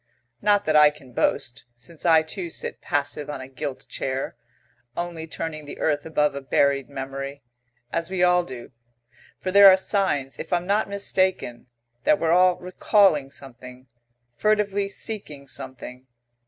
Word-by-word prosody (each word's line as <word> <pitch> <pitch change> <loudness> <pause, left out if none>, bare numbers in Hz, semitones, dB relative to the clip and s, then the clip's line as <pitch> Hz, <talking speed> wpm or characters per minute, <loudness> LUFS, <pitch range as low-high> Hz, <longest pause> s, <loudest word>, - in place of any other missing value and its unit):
Not 205 0 +3
that 155 - +1
I 150 0 +8
can 140 -4 -15
boast, 120 0 -1
since 155 +8 -7
I 160 -1 +6
too 170 +2 -4
sit - - -5
passive 145 0 -2
on 145 - -4
a 130 - -8
gilt 135 +1 -6
chair, 130 0 -3 0.6
only 170 -2 -4
turning 155 -1 -5
the 145 - -8
earth 145 -1 0
above 150 -2 +1
a 140 - -5
buried 140 0 +1
memory, 135 0 -6 0.5
as 165 0 -1
we 185 -1 0
all 180 0 +4
do, 125 -7 -9 0.7
for 185 - -4
there 200 0 +9
are 190 - +7
signs, 190 -9 -1
if - - -7
I'm 175 0 +1
not 200 +2 +1
mistaken, 185 -11 -1 0.4
that 200 - +4
we're 165 -3 0
all 180 +1 +5
recalling 180 -5 +2
something, 130 -2 -11 0.5
furtively 205 - +1
seeking 195 -11 -6
something. 130 -1 -9
155 Hz, 155 wpm, -24 LUFS, 135-185 Hz, 0.7 s, there